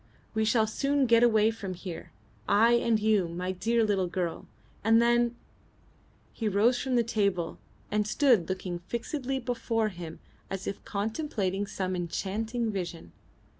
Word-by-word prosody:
We 220 0 +1
shall 220 0 +3
soon 275 +5 +1
get 230 -1 +5
away 220 -2 +5
from 195 -5 -6
here, 175 -2 -8 0.4
I 220 +3 +5
and 235 -2 +3
you, 210 -4 +2
my 180 +2 -3
dear 225 +5 +1
little 200 -4 +1
girl, 175 -1 -3 0.4
and 225 +2 +5
then 240 0 +3 0.5
" - - -33
He 225 - -2
rose 215 +5 +3
from 260 -1 -1
the 240 - +4
table 200 -7 -1 0.3
and 210 0 +1
stood 230 - +3
looking 185 -2 -3
fixedly 250 - -3
before 235 -3 -1
him 170 -4 -8 0.3
as 195 -1 -4
if 195 - -5
contemplating 205 - -2
some 185 -1 -2
enchanting 220 +6 -2
vision. 175 -4 -5
215 Hz, 150 wpm, -29 LUFS, 185-235 Hz, 0.5 s, get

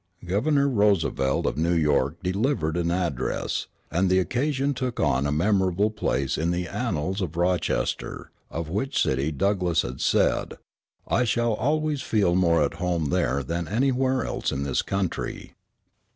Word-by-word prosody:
Governor 140 - +2
Roosevelt 100 - +1
of - - -1
New 85 +2 +2
York 75 0 +1
delivered 95 - 0
an 85 -1 0
address; 85 -8 -1 0.2
and 90 +4 +2
the 95 - +4
occasion 135 +8 0
took 125 -2 -3
a 70 +3 +1
memorable 95 +4 +2
place 70 -10 -1
in 80 +2 0
the 85 0 -1
annals 95 -4 -2
of 85 -3 -4
Rochester, 90 -1 -1 0.2
of 80 0 -4
which 105 - -1
city 65 +4 +1
Douglass 90 0 +1
had 65 +2 -6
said, - - +1 0.5
"I 125 - +2
shall 120 -1 +1
always 150 +4 0
feel 100 -6 +1
more 85 -3 +3
at 70 - -1
home 85 -5 0
there 70 +2 +1
than 85 +4 -3
anywhere 130 +3 +1
else - - -2
in 70 - -2
this 70 -2 0
country." 95 -3 -3
90 Hz, 150 wpm, -25 LUFS, 80-115 Hz, 0.5 s, the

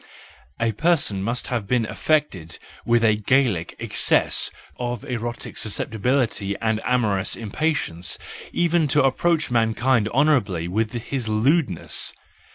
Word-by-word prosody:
A 115 -1 +1
person 140 - +1
must 120 +5 -2
have 115 -5 -2
been 120 -1 +1
affected 110 - -1 0.3
with 120 0 +3
a 110 -2 +4
Gallic 110 -6 +1
excess - - +2 0.3
of 120 -2 -3
erotic 120 -1 -5
susceptibility 110 -1 0
and 110 -1 0
amorous 105 -6 +1
im¬ 110 -3 -8
patience 150 - 0 0.3
even 170 -2 +2
to 145 +1 +3
approach 155 +2 +1
mankind 115 0 +2
honourably 120 - +2
with 110 +4 -1
his 120 0 -3
lewdness. 115 - +1
115 Hz, 120 wpm, -23 LUFS, 105-135 Hz, 0.3 s, a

